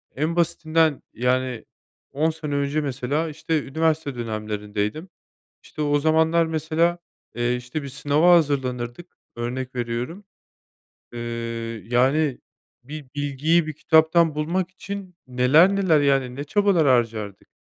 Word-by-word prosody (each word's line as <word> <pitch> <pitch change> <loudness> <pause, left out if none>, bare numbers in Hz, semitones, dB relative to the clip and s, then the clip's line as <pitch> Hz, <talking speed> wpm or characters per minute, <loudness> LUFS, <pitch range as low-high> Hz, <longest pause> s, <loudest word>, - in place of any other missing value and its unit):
en 155 +4 -1
basitinden 160 -3 +1
yani 125 -1 -1 0.5
10 155 +4 +1
sene 155 -3 -4
önce 140 +2 0
mesela 140 +4 -2
işte 155 0 -2
üniversite 155 -1 -1
dönemlerindeydim. 105 - -4 0.5
İşte 155 - -6
o 145 0 +2
zamanlar 160 +2 +3
mesela, 160 +2 0 0.4
eee, 120 +1 0
işte 125 +5 -5
bir 140 - -6
sınava 150 +5 +3
hazırlanırdık, 130 -1 -1 0.3
örnek 125 +2 -4
veriyorum. 120 - -4 0.9
Eee, 120 - -6 0.7
yani 130 +4 +2 0.4
bir 150 +2 -8
bilgiyi 145 +4 +1
bir 155 - -4
kitaptan 160 +1 +3
bulmak 175 +4 -1
için, 190 -1 -8
neler 140 +10 +4
neler, 170 -7 +3
yani, 135 -3 +1
ne 140 - -4
çabalar 190 -2 +2
harcardık. 115 -5 0
145 Hz, 120 wpm, -23 LUFS, 125-160 Hz, 0.9 s, neler